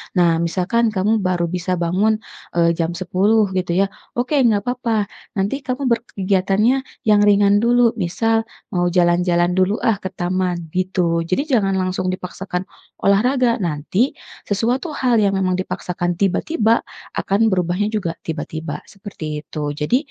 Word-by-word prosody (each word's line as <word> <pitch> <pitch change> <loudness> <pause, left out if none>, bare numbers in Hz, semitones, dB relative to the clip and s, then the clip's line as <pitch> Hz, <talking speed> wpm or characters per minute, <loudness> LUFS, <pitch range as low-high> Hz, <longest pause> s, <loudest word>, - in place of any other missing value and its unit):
Nah, 170 -2 +3
misalkan 200 +6 0
kamu 210 +4 +2
baru 185 -2 0
bisa 180 0 -1
bangun, 195 +6 +1 0.3
eee, 170 -1 +4
jam 170 +1 -2
10.00 195 +4 +2
gitu 185 -2 -1
ya, 195 - -3 0.2
oke, 255 +4 +1
enggak 220 -6 +3
papa. 230 -4 -1 0.2
nanti 200 +8 -1
kamu 260 -1 -2
berkegiatannya 200 0 +1 0.3
yang 210 -1 +4
ringan 205 0 +5
dulu, 240 0 +4
misal, 225 +6 0 0.2
"Mau 175 -1 +1
jalan-jalan 175 0 +2
dulu 185 +3 +2
ah 220 -4 +2
ke 190 - -4
taman," 180 -1 -2
gitu. 180 -2 0
Jadi 190 +11 +1
jangan 210 -8 +2
langsung 185 0 -1
dipaksakan 180 0 -5 0.4
olahraga, 240 +4 +3
nanti 175 - 0 0.3
sesuatu 240 - -1
hal 255 -4 +1
yang 195 -1 +2
memang 185 -1 +1
dipaksakan 175 -1 -2
tiba-tiba 220 - +2 0.3
akan 210 +3 +2
berubahnya 180 +2 0
juga 180 -6 -1
tiba-tiba 160 -1 -5
seperti 165 -7 -7
itu. 150 -2 -3
Jadi 150 - +1
190 Hz, 140 wpm, -20 LUFS, 175-225 Hz, 0.4 s, ringan